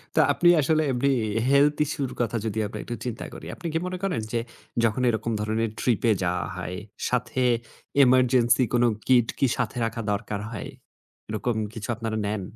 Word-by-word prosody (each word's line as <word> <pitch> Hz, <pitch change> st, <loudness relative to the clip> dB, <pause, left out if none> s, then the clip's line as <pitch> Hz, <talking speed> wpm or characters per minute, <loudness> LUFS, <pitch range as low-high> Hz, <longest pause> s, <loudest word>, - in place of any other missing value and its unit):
তো, -, -, +4 dB
আপনি 175 Hz, -, +4 dB
আসলে 155 Hz, +3 st, +2 dB
এমনি 135 Hz, +3 st, +2 dB, 0.3 s
এ -, -, -1 dB
health 145 Hz, +1 st, +4 dB
issue 140 Hz, -1 st, -2 dB
র -, -, -10 dB
কথা 120 Hz, 0 st, 0 dB
যদি 110 Hz, 0 st, -3 dB
আমরা -, -, -7 dB
একটু 120 Hz, -, -5 dB
চিন্তা 120 Hz, -2 st, -4 dB
করি। -, -, -9 dB
আপনি 175 Hz, -, -6 dB
কি -, -, +2 dB
মনে 185 Hz, 0 st, -4 dB
করেন 180 Hz, -, 0 dB
যে, 115 Hz, -, +2 dB, 0.4 s
যখন 115 Hz, +3 st, +2 dB
এরকম 115 Hz, 0 st, -1 dB
ধরনের 110 Hz, +1 st, 0 dB
ট্রিপে 120 Hz, -1 st, +2 dB
যাওয়া 90 Hz, 0 st, 0 dB
হয়, 90 Hz, 0 st, -5 dB, 0.3 s
সাথে 125 Hz, 0 st, -1 dB, 0.6 s
এমার্জেন্সি 125 Hz, -1 st, +4 dB
কোন 120 Hz, -, +4 dB, 0.2 s
কিট 120 Hz, -3 st, +5 dB
কি 135 Hz, -, +4 dB
সাথে 125 Hz, -, -2 dB
রাখা 115 Hz, 0 st, -3 dB
দরকার 100 Hz, 0 st, -2 dB
হয়, 110 Hz, -, -6 dB, 0.6 s
এরকম 110 Hz, +2 st, -1 dB, 0.2 s
কিছু 110 Hz, -1 st, -6 dB
আপনারা 110 Hz, -1 st, -3 dB
নেন? 105 Hz, -1 st, -2 dB
120 Hz, 180 wpm, -25 LUFS, 110-130 Hz, 0.6 s, কিট